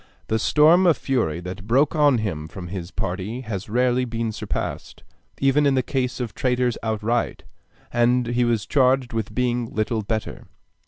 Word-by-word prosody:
The 110 - +1
storm 160 - +5
of 165 - +4
fury 90 - -1
that 95 +3 -8
broke 135 +7 +3
on 145 -4 +4
him 80 -9 -3
from 90 +2 -8
his 90 -2 -5
party 95 +7 -4
has 110 -3 -5
rarely 125 +2 +2
been 115 -2 -2
surpassed, 110 - -5 0.4
even 140 +2 +3
in 135 - +3
the 130 - +2
case 130 0 -2
of 120 -3 -4
traitors 125 -2 0
outright, 110 +2 -1 0.5
and 120 +1 +3
he 120 +1 +1
was 115 -3 +1
charged 130 -2 +2
with 110 -1 -3
being 120 -1 0
little 110 +1 -1
better. 110 +1 -4
120 Hz, 165 wpm, -23 LUFS, 110-130 Hz, 0.5 s, storm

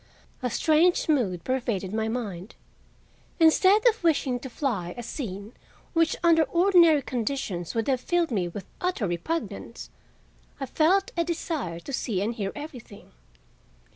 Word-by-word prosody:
A 250 - -1
strange 320 - +3
mood 210 - +1
pervaded 230 -7 -2
my 220 0 0
mind. 215 -5 -5 0.8
Instead 375 +7 +5
of 450 -4 +2
wishing 280 -6 +1
to 265 - -8
fly 210 - -3
a 240 - -5
scene 215 -4 -6 0.4
which 330 -2 +2
under 335 -1 +5
ordinary 335 -1 +4
conditions 225 -9 -3
would 225 -1 -1
have 260 -2 +1
filled 345 +1 0
me 190 -6 0
with 190 +3 -7 0.2
utter 360 - -1
repugnance, 175 - -4 0.7
I 270 - -2
felt 350 +9 +2
a 340 - +1
desire 315 - -3
to 280 - -8
see 220 -6 -1
and 210 +4 -1
hear 200 -4 -3
everything. 260 -9 -10
260 Hz, 140 wpm, -26 LUFS, 205-330 Hz, 0.8 s, Instead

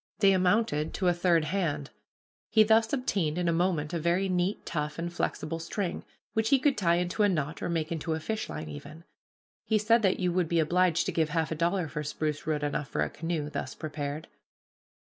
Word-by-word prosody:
They 200 -1 +5
amounted 180 -4 +1
to 185 - +2
a - - +3
third 170 -2 +2
hand. 155 -5 -2 0.6
He 220 - +6
thus 225 +1 +3
obtained 195 - 0
in 175 -1 0
a 170 - +3
moment 165 -3 0
a 170 - 0
very 170 +4 +1
neat, 180 +2 0
tough, 150 -1 -3
and 170 +1 -4
flexible 165 -1 -2
string, 180 +2 -3 0.3
which 220 0 +1
he 275 - +6
could 275 +1 +2
tie 170 -4 +2
into 180 +4 -1
a 205 - +5
knot, 150 -4 -2
or - - -2
make 165 -2 -1
into 160 0 -2
a - - -3
fishline 215 -4 -4
even. 150 +3 -9 0.6
He 220 - +2
said 225 +2 +3
that 190 -3 +2
you 180 -2 +1
would 175 -3 +1
be 170 - +2
obliged 170 +1 +2
to - - -1
give 160 -2 +1
half 160 0 -1
a - - 0
dollar 170 +2 0
for 150 0 -4
spruce 150 0 -3
root 150 -2 0
enough 145 0 -1
for - - -1
a - - -3
canoe, 165 -3 -3
thus 130 - -4
prepared. 150 0 -5
170 Hz, 210 wpm, -29 LUFS, 155-190 Hz, 0.6 s, He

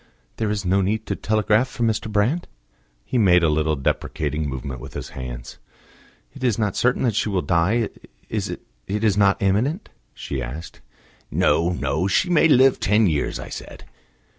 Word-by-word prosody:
"There 110 -2 -1
is 105 -2 -2
no 95 +2 +3
need 110 +3 -1
to - - -2
telegraph 110 +3 +2
for 120 - -4
Mr. 110 -1 0
Brand?" 115 +12 +1 0.6
He 125 - 0
made 90 -4 +5
a 80 - +4
little 75 0 +1
deprecating 75 +2 -2
movement 65 -1 -5
with - - -10
his - - -5
hands. - - -8 0.7
"It 135 - -10
is 120 -5 +2
not 105 -3 0
certain 125 +2 +1
that 120 -4 +2
she 105 +1 0
will 95 -3 0
die 95 +7 +2 0.4
it - - -3 0.3
is 105 0 +1
not 100 -1 +3
imminent?" 125 - 0 0.3
she 70 -2 -4
asked. 65 +7 -7 0.5
"No, 80 +3 +2
no; 80 0 -1
she 180 - +1
may 165 -1 +5
live 135 -3 +5
ten 105 +2 +3
years, 80 -6 0
I - - -7
said." - - -9
100 Hz, 170 wpm, -22 LUFS, 80-110 Hz, 0.7 s, made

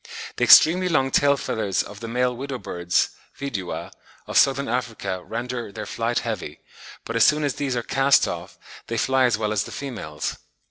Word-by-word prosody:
The - - 0
extremely 180 +3 +7
long 135 -5 +2
tail 140 +1 +4
feathers 105 -7 -1
of 100 0 -11
the 115 - -6
male 125 +1 0
widow 135 +1 -5
birds 90 -6 0 0.3
(Vidua) 105 -10 -5 0.3
of - - -7
Southern 140 0 +4
Africa 110 -6 -3
render 120 -1 -5
"their - - -6
flight 115 +1 -2
heavy;" 105 -10 -5 0.5
but 115 - -5
as 115 - +5
soon 150 +3 +4
as 145 -2 0
these 135 -2 -2
are 120 - -2
cast 135 +2 +3
off - - -6 0.3
they 115 - -3
fly 130 +2 +3
as 120 -3 +2
well 105 -1 -1
as 105 -1 +1
the - - -9
females. 110 - -5
120 Hz, 185 wpm, -23 LUFS, 110-135 Hz, 0.5 s, extremely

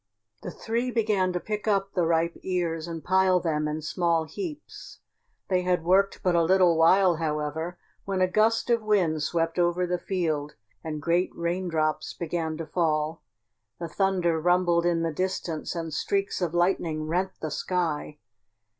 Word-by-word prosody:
The - - -6
three 235 +3 -2
began 210 -6 +1
to 180 - -1
pick 210 +3 -4
up 195 -1 +1
the 175 -3 +1
ripe 165 +1 +1
ears 170 -3 -2
and 165 -3 -6
pile 185 +2 +3
them 155 -3 -1
in 150 +1 -4
small 165 +1 +1
heaps. 305 - -8 0.5
They 185 -1 +1
had 180 -2 0
worked 195 +3 +2
but 180 - +2
a 170 - +4
little 180 0 +4
while, 175 +2 +4
however, 160 +2 -3 0.3
when 195 -1 -2
a 185 - +4
gust 220 +5 +2
of 235 -1 +3
wind 185 -8 +1
swept 165 +2 -1
over 175 +1 +2
the 180 0 -1
field 155 -7 -2 0.3
and 155 -2 -5
great 175 +3 +2
raindrops 170 -3 -1
began 165 -2 -3
to 165 - -5
fall. 155 -2 -1 0.6
The 170 - -4
thunder 180 -3 +1
rumbled 175 0 +3
in 165 -1 +1
the 165 -1 -1
distance 180 -2 -3
and 165 -2 -4
streaks 195 +4 -1
of 175 -1 -1
lightning 175 -3 +1
rent 180 +4 -1
the 155 - -4
sky. 160 -3 -2
175 Hz, 165 wpm, -26 LUFS, 160-185 Hz, 0.6 s, a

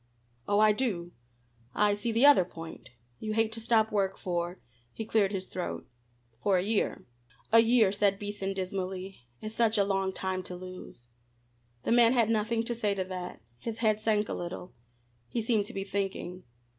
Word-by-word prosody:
"Oh, 205 0 +3
I 215 0 +6
do. 205 -7 -1 0.6
I 210 0 +4
see 205 +3 -2
the 230 +5 +4
other 290 -10 +8
point. 165 -2 -10 0.3
You 215 -1 -3
hate 225 0 +2
to 225 - -5
stop 225 -1 +2
work 195 -2 0
for," 175 0 -2 0.3
he 225 - -6
cleared 210 -3 +2
his 190 -2 -3
throat 180 - -5 0.5
"for 195 +4 +2
a 180 - +1
year." 210 +1 0 0.5
"A 230 - +8
year," 225 -3 +5
said 200 -1 +2
Beason 205 -1 -4
dismally, 190 0 -4 0.2
"is 215 0 -5
such 225 -1 +2
a 200 - +5
long 195 -1 0
time 190 0 -3
to 180 0 -7
lose." 185 -9 -10 0.8
The - - -1
man 235 0 +6
had 230 -3 +3
nothing 225 +1 +1
to 240 - -2
say 210 -3 0
to 190 - -1
that. 180 -9 -7 0.2
His 225 - -5
head 215 -2 +2
sank 215 -1 +1
a - - -3
little. 175 +1 -6 0.5
He 235 - -2
seemed 220 -2 +1
to - - -9
be 195 - -3
thinking. 195 -2 -3
205 Hz, 180 wpm, -30 LUFS, 185-220 Hz, 0.8 s, other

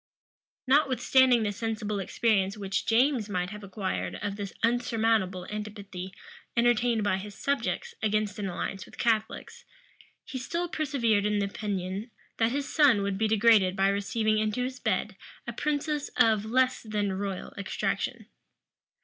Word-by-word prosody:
Notwithstanding 260 -3 +4
the 205 - 0
sensible 215 -1 -3
experience 195 0 +1
which 195 -1 -2
James 240 -1 +3
might 180 -1 -2
have 210 -1 -8
acquired 195 -1 -3
of 200 -1 -4
the 200 -2 -5
unsurmountable 225 -5 +1
antipathy 205 -3 -6 0.5
entertained 235 -1 +3
by 205 -2 +1
his 200 +1 -8
subjects 285 +11 -2
against 215 -1 0
an 200 -2 -2
alliance 185 +2 -4
with - - -15
Catholics, 220 -2 -1 0.6
he 260 - -5
still 340 +7 -2
persevered 245 -11 +1
in 210 0 +1
the 200 - +1
opinion, 195 +1 -4 0.3
that 225 0 +2
his 280 +1 -2
son 265 -10 +5
would 200 -1 -2
be 220 - +2
degraded 215 -3 +4
by 195 0 +3
receiving 215 +2 +1
into 215 +3 0
his 255 0 -4
bed - - -1 0.3
a - - -5
princess 300 0 -1
of 215 -2 +4
less 255 +3 +2
than 210 -3 -1
royal 195 -1 -4
extraction. 200 -2 -2
215 Hz, 145 wpm, -28 LUFS, 200-240 Hz, 0.6 s, son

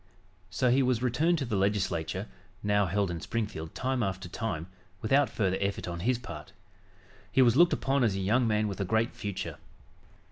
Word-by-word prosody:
So 120 +6 +1
he 135 +2 +4
was 125 -2 +1
returned 155 +8 +2
to 140 - -2
the 115 -3 -2
Legislature, 95 -4 0 0.4
now 100 -1 +2
held 100 +1 0
in 85 -2 -5
Springfield, 105 -8 -4
time 130 -1 -1
after 95 -3 -2
time, 90 -4 -3 0.3
without 135 +7 +3
further 95 -3 0
effort 100 -1 -2
on 85 -1 -4
his 120 +7 +1
part. 120 - -9 0.8
He 130 - +5
was 120 -1 +4
looked 170 +4 +6
upon 135 0 +1
as 105 -5 +2
a - - -2
young 115 +6 +2
man 105 0 +1
with 100 0 -4
a - - +2
great 110 +4 +1
future. 100 -3 -5
105 Hz, 185 wpm, -29 LUFS, 95-125 Hz, 0.8 s, looked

